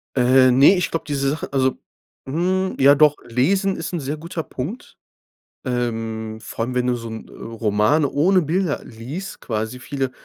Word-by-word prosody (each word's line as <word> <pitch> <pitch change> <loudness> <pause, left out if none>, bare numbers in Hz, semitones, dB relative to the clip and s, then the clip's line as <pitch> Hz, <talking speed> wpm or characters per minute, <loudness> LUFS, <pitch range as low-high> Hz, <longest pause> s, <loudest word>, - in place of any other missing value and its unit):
Äh, 130 0 +5
ne, 135 +9 +6
ich 180 - -1
glaub, 165 - -3
diese 140 -2 -1
Sache, 150 +3 -4
also 130 -1 +1 0.5
hm, 185 +6 0
ja 140 +2 +7
doch, 150 0 +5
lesen 190 - +1
ist 165 - -5
'n 175 - -1
sehr 145 +1 -4
guter 165 +1 -5
Punkt. 150 - -7 0.7
Ähm, 115 -3 -3
vor 115 - -4
allem, 125 +1 -5
wenn 125 0 +1
du 125 - +2
so 115 -1 -7
'n 110 0 -8
Roman 115 +6 0
ohne 180 +7 +3
Bilder 170 0 -1
liest, 130 +12 -8
quasi 110 +2 -3
viele 135 0 -3
135 Hz, 170 wpm, -21 LUFS, 120-160 Hz, 0.7 s, ja